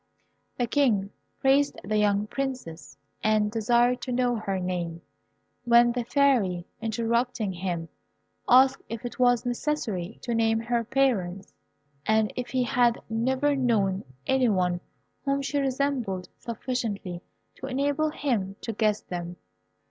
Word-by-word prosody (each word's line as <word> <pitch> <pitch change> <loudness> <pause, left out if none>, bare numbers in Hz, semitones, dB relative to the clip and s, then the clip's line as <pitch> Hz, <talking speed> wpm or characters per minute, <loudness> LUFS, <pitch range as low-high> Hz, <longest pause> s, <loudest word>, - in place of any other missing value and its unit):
The 245 - +1
King 225 -7 +1 0.3
praised 275 +2 +3
the 215 - -1
young 205 0 +2
Princess, 230 - -5 0.3
and 215 -1 +2
desired 240 +2 +2
to 255 - -4
know 245 0 +1
her 200 -3 -2
name, 175 -2 -3 0.6
when 240 0 +5
the 245 0 -2
Fairy, 235 -10 +2 0.2
interrupting 230 -1 0
him, 175 -2 -3 0.6
asked 260 +2 +6
if 230 +1 -6
it 245 - -6
was 245 -1 +3
necessary 235 - -2
to 240 - -2
name 225 -1 +2
her 235 +1 0
parents, 210 -7 0 0.5
and 220 +2 +2
if 250 -1 -4
he 255 -1 +1
had 245 -2 +2
never 260 +5 +1
known 210 -7 +1 0.2
any 265 -2 +3
one 180 -3 +1 0.4
whom 275 0 0
she 285 +1 -1
resembled 260 -9 -1
sufficiently 225 -7 -4 0.4
to 265 - -6
enable 285 +4 0
him 220 -11 -1
to 230 - -4
guess 210 -1 +1
them. 175 -1 -6
235 Hz, 135 wpm, -27 LUFS, 200-255 Hz, 0.6 s, asked